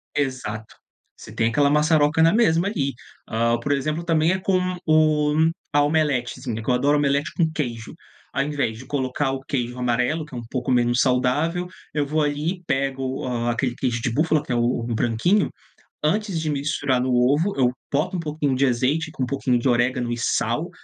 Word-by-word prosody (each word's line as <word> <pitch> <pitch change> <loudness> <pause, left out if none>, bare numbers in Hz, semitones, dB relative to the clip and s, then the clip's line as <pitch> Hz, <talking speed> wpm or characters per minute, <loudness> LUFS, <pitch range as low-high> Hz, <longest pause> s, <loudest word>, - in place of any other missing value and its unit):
Exato, 125 -6 -3 0.4
você - - -12
tem 115 - +1
aquela 140 +4 +3
maçaroca 150 +1 +3
na 165 +2 +5
mesma 190 -6 +3
ali. 140 -10 -1 0.3
Hã, 115 +1 +1
por 145 +4 -3
exemplo, 155 +4 -1
também, 165 0 +2
é 190 - 0
com 185 -1 0
o 155 -1 +3 0.4
a 145 0 +4
omeletezinha, 130 -6 -1
que 125 - 0
adoro 140 +4 +3
omelete 140 0 +1
com 165 -2 +2
queijo. 120 -8 -4 0.4
Ao 140 +1 +1
invés 140 -7 -2
de 130 - -11
colocar 135 0 -1
o 135 - -4
queijo 125 -2 -3
amarelo, 125 +6 0
que 150 - -17
é - - -4
um 120 - -6
pouco 130 -1 -2
menos 120 0 +2
saudável, 145 +8 +1 0.3
eu 150 -1 0
vou 155 +2 0
ali 150 +5 -2
pego, 135 -1 -2
hã, 120 -1 -1
aquele 120 +1 -1
queijo 120 -3 -1
de 120 - -1
búfala 155 +2 +2
que - - -7
é - - +1
o 120 - +2 0.3
o 115 - -1
branquinho, 120 - +2 0.5
antes 195 +2 0
de 155 -1 -2
misturar 140 -3 0
no 130 0 0
ovo 145 +10 +2
eu 125 -2 +3 0.2
boto 165 +7 0
um - - -3
pouquinho 150 -4 -1
de 135 +2 +2
azeite 135 +6 0
com 135 - -3
um - - +1
pouquinho 125 -1 0
de 125 - -1
orégano 120 0 +1
e 120 - -2
sal, 120 - 0
140 Hz, 195 wpm, -23 LUFS, 125-155 Hz, 0.5 s, na